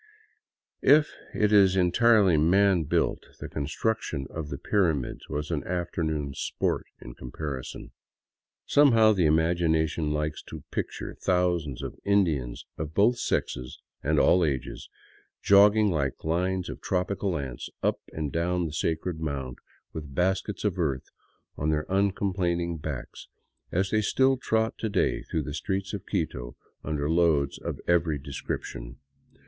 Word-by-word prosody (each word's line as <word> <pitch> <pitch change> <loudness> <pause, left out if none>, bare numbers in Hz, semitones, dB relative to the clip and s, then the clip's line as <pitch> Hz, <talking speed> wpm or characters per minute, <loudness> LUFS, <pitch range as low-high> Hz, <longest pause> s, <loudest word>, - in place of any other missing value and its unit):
If 150 +1 +5 0.2
it 105 -1 +1
is 95 -2 +6
entirely 95 +1 +4
man 90 +2 +4
built, - - 0
the - - -6
con 70 -2 -4
struction 80 -6 -2
of 80 -3 -5
the 70 - -4
pyramids 80 - 0
was 75 +3 -3
an 75 -3 -1
afternoon 80 -5 -2
sport - - -2
in - - -10
comparison. 65 +1 -6 0.8
Sbmehow 115 -7 +5
the 90 -4 +3
imagination 80 -1 +2
likes 75 +1 -2
to - - -9
picture - - -4
thousands 90 -7 0
of - - -7
Indians 80 -12 +1
of 75 0 -5
both 115 +4 +4
sexes 60 0 -2 0.2
and 75 +1 +2
all 90 0 +5
ages 65 -5 -3 0.5
jogging 105 +1 +6
like 70 -5 -2
lines 90 +3 0
of - - -7
tropical 95 0 -1
ants 65 -4 -6
up - - +1
and 75 -3 -3
down 90 +1 0
the 75 - -5
sacred 80 +1 -2
mound, 70 -5 -4 0.3
with 75 -4 -7
baskets 95 +3 0
of 100 -3 -1
earth 70 -6 -1 0.5
on 75 - -1
their 75 0 0
uncomplaining 90 -4 0
backs, 75 -4 -6 0.4
as 95 +2 0
they 110 - +3
still 130 +5 +3
trot 110 -3 -1
to 110 - -1
day - - +1
through 80 - -3
the 70 - -6
streets 95 +6 -3
of 100 - -6
Quito - - -3 0.3
under 75 -2 -2
loads 80 -4 +2
of - - -5
every 85 -3 +2
description. 65 -3 -6
85 Hz, 140 wpm, -27 LUFS, 75-95 Hz, 0.8 s, is